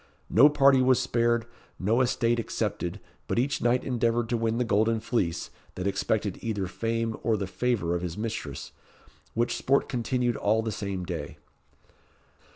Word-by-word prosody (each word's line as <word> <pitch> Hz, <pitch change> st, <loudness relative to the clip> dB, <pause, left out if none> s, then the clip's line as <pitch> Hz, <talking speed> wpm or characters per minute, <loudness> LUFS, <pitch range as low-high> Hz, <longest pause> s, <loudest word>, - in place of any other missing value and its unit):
No 145 Hz, -, +7 dB
party 140 Hz, -2 st, +5 dB
was 130 Hz, -1 st, +4 dB
spared, 120 Hz, -2 st, +1 dB, 0.3 s
no 110 Hz, +6 st, +2 dB
estate 120 Hz, -2 st, +1 dB
excepted, 105 Hz, -4 st, -3 dB, 0.3 s
but -, -, -1 dB
each 130 Hz, +4 st, 0 dB
knight 120 Hz, +1 st, +2 dB
endeavoured 120 Hz, -2 st, 0 dB
to 120 Hz, -, +1 dB
win 115 Hz, 0 st, 0 dB
the 125 Hz, -, +2 dB
golden 110 Hz, 0 st, +2 dB
fleece, 105 Hz, -7 st, -2 dB, 0.2 s
that 90 Hz, -, -4 dB
expected 100 Hz, 0 st, -1 dB
either 105 Hz, -4 st, -2 dB
fame 115 Hz, +3 st, -2 dB
or 115 Hz, -2 st, +1 dB
the 100 Hz, -, -2 dB
favour 100 Hz, -3 st, -1 dB
of 85 Hz, -, -1 dB
his 90 Hz, -1 st, -4 dB
mistress, 105 Hz, -, -5 dB, 0.6 s
which 120 Hz, +1 st, +1 dB
sport 140 Hz, +2 st, +2 dB
continued 120 Hz, -1 st, -1 dB
all 110 Hz, +2 st, +1 dB
the 110 Hz, -, -2 dB
same 100 Hz, -3 st, -4 dB
day." 85 Hz, -2 st, -5 dB
115 Hz, 160 wpm, -27 LUFS, 100-120 Hz, 0.6 s, No